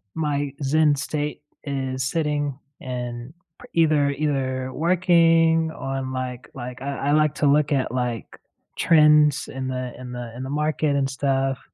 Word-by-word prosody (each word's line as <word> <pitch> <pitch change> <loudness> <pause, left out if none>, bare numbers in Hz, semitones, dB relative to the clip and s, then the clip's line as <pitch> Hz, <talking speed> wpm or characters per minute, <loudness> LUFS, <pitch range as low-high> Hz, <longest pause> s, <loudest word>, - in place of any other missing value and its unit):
my 145 -3 -1
Zen 150 +1 +3
state 145 +1 -3 0.2
is 130 -2 -3
sitting, 145 -1 -1 0.2
and 125 0 -5 0.3
p - - -11 0.2
either 150 -3 +3
either 130 -3 -2
working 165 -1 +3
on, 135 -3 -4
like 125 -1 -5
like, 125 0 -7
uh, - - -6
I 140 0 -1
like 150 -1 +3
to 145 - 0
look 145 +1 +3
at, 135 -4 +1
like, 125 -2 -3 0.4
trends 150 -2 +5
in 130 0 -5
the 130 -1 -4
in 125 -1 -8
the 120 -2 -6
in 125 - -7
the 130 - -5
market 150 -1 0
and 135 -1 +1
stuff, 135 -1 0
140 Hz, 155 wpm, -23 LUFS, 130-150 Hz, 0.4 s, trends